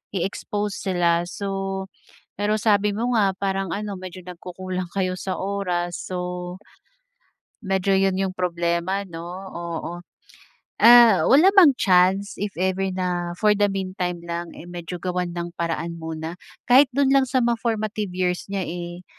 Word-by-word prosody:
i-expose 205 +2 -3
sila. 175 -2 +2
So, 195 0 -3 0.6
pero 210 +1 +1
sabi 205 -1 +3
mo 235 +3 -1
nga 200 -3 +3
parang 195 -1 -2
ano 205 -1 -4
medyo 185 0 -8
nagkukulang 180 +1 -6
kayo 185 -2 0
sa 190 - -3
oras. 180 -3 -2
So 180 0 -5 1.1
medyo 195 0 +1
'yon 190 -1 +2
'yong 190 -1 -1
problema, 175 +2 -1
'no, 165 -3 -8 0.3
oo. 170 0 -5 0.9
Ah, 235 -4 +8
wala 335 +9 +6
bang 335 -10 +7
chance, 190 +1 +3
if 205 -3 -4
ever 190 +1 0
na 180 -2 -2
for 210 +1 +4
the 205 0 +2
meantime 185 -2 -3
lang, 170 0 -4
eh, 170 - -10
medyo 175 0 -6
gawan 180 0 -2
ng 170 0 -5
paraan 170 0 -3
muna. 160 0 -5 0.3
Kahit 260 +2 +6
do'n 275 +1 +2
lang 270 -2 +3
sa 260 - +1
mga 235 -2 +1
formative 215 -3 -2
years 180 +1 -1
niya, 195 -2 -2
eh, 175 +1 -6
185 Hz, 145 wpm, -23 LUFS, 175-205 Hz, 1.1 s, Ah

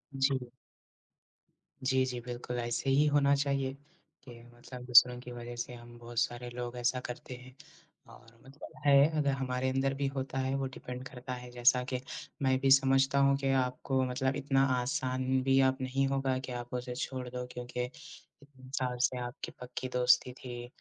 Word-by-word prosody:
जी। 135 -2 +1 1.3
जी, 130 0 +2
जी, 125 -1 -4
बिल्कुल, 125 0 -5
ऐसे 120 +3 -2
ही 140 +3 +4
होना 145 -1 +4
चाहिए 140 -1 0 0.5
कि 120 -3 -12
मतलब 125 +1 -10
दूसरों 125 0 +7
की 125 - -9
वजह 120 0 -7
से 120 +1 -5
हम 120 0 -12
बहुत 120 0 -4
सारे 120 +1 -1
लोग 120 0 -6
ऐसा 125 +1 +1
करते 125 +1 -7
हैं 130 0 -13 0.6
और 110 - -17 0.2
मतलब 135 +2 -12
है, 140 +1 +7
अगर 145 -2 +2
हमारे 130 -1 -1
अंदर 135 +1 +1
भी 140 0 -1
होता 135 0 -3
है, 130 +1 0
वो 135 0 -1
डिपेंड 125 0 -7
करता 125 0 -7
है। 125 0 -8
जैसा 125 +1 +3
कि 130 - -1 0.4
मैं 130 -1 +3
भी 135 0 +2
समझता 135 0 +5
हूँ 140 0 +5
कि 135 -1 -1
आपको 130 +1 -1
मतलब 130 +1 -1
इतना 135 -1 +2 0.2
आसान 130 -1 0
भी 135 0 +4
आप 130 +1 -4
नहीं 135 +1 0
होगा 135 -1 0
कि 130 -1 -7
आप 120 0 -6
उसे 125 0 -4
छोड़ 130 0 -4
दो, 125 0 -5
क्योंकि 125 0 -4
इतने 140 -1 -13
साल 125 -1 -2
से 125 - +2
आपकी 120 - -7
पक्की 125 +1 -5
दोस्ती 125 0 +4
थी, 120 -1 -8
130 Hz, 180 wpm, -31 LUFS, 125-135 Hz, 1.3 s, दूसरों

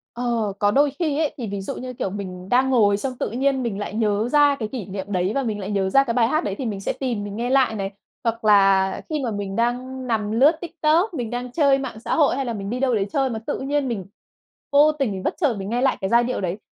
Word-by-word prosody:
Ờ, 235 -4 -1
có 205 0 +3
đôi 285 +4 +3
khi 310 -4 0
ấy, 310 -3 0
thì 235 - -4
ví 200 -1 -4
dụ 195 - -5
như, 255 0 -6
kiểu, 195 - -3
mình 185 -2 -7
đang 260 +2 +3
ngồi 210 -6 +4
xong 255 +3 -4
tự - - -2
nhiên 265 +1 0
mình 215 -4 -3
lại 205 - -5
nhớ 215 0 0
ra 290 0 +5
cái 220 - -2
kỷ 225 -3 -6
niệm 195 +1 -6
đấy 185 +1 0
và 275 - +1
mình 215 -3 -2
lại 200 +2 -5
nhớ 195 -1 0
ra 275 +7 +5
cái 235 - -2
bài 230 -1 +3
hát 310 +6 0
đấy 195 - -2
thì 265 - -4
mình 205 -3 -3
sẽ - - -2
tìm 240 -6 -3
mình 205 0 -6
nghe 240 +3 -2
lại 260 -4 +3
này. 195 -2 -3 0.3
Hoặc 230 0 -2
là 195 -2 +4
khi 310 - -1
mà 240 - -1
mình 200 -2 -4
đang 250 +3 -2
nằm 215 -3 -1
lướt 265 +8 +5
TikTok, 340 +3 +1
mình 245 -8 -3
đang 245 +1 -4
chơi 280 -2 +3
mạng 260 -5 -6
xã - - -2
hội 295 -5 +3
hay 270 0 -2
là 235 - -2
mình 200 -2 -5
đi 245 +3 -3
đâu 255 -3 +2
đấy 200 -1 0
chơi 270 -1 +1
mà 225 -2 -3
tự - - -2
nhiên 280 0 -1
mình 215 -7 -3 0.7
vô 295 +2 +6
tình, 235 -11 -2
bất 335 - -1
chợt 290 -10 +1
mình 195 - -5
nghe 240 +2 0
lại 265 0 +2
cái 190 - -1
giai 235 +1 +4
điệu 250 -2 -2
đấy, 185 +1 -2
235 Hz, 280 wpm, -22 LUFS, 205-270 Hz, 0.7 s, vô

